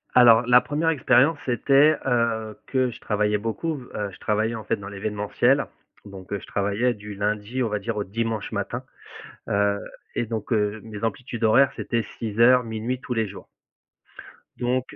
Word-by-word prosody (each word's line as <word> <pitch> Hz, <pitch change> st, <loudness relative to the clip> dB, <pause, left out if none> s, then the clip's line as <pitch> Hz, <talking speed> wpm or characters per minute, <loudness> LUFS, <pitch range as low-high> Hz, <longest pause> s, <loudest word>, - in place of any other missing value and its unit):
Alors, 120 Hz, -2 st, +7 dB
la 125 Hz, +1 st, +6 dB
1re 155 Hz, +3 st, 0 dB
expérience, 145 Hz, 0 st, +3 dB
c'était, 140 Hz, +4 st, +4 dB
heu, 115 Hz, -4 st, 0 dB
que 130 Hz, -2 st, +1 dB
je 120 Hz, -, -11 dB
travaillais 105 Hz, 0 st, 0 dB
beaucoup, 115 Hz, +10 st, -3 dB, 0.2 s
heu, 105 Hz, -1 st, -2 dB
je -, -, -15 dB
travaillais, 110 Hz, +2 st, 0 dB
en 110 Hz, -, -6 dB
fait, -, -, 0 dB
dans 100 Hz, -2 st, -9 dB
l'événementiel, 105 Hz, +1 st, 0 dB, 0.4 s
donc 95 Hz, -2 st, -11 dB
heu, 100 Hz, -, -1 dB
je -, -, -12 dB
travaillais 105 Hz, +5 st, 0 dB
du 105 Hz, -1 st, -9 dB
lundi, 105 Hz, +5 st, -1 dB
on 115 Hz, -, -1 dB
va 105 Hz, 0 st, -1 dB
dire, 105 Hz, +2 st, -4 dB
au 105 Hz, -, 0 dB
dimanche 110 Hz, +1 st, -3 dB
matin, -, -, -3 dB, 0.7 s
heu 100 Hz, 0 st, +2 dB, 0.4 s
et -, -, +1 dB
donc 110 Hz, -2 st, -5 dB
heu, 105 Hz, -1 st, 0 dB
mes 110 Hz, -1 st, -7 dB
amplitudes 115 Hz, +1 st, -4 dB
horaires, 130 Hz, +5 st, +5 dB
c'était 115 Hz, -1 st, -1 dB, 0.2 s
6:00-00:00, 115 Hz, +1 st, +2 dB
tous -, -, -5 dB
les 115 Hz, -1 st, 0 dB
jours. 100 Hz, -, -11 dB, 1.1 s
Donc 125 Hz, +3 st, -1 dB
110 Hz, 170 wpm, -24 LUFS, 105-125 Hz, 1.1 s, Alors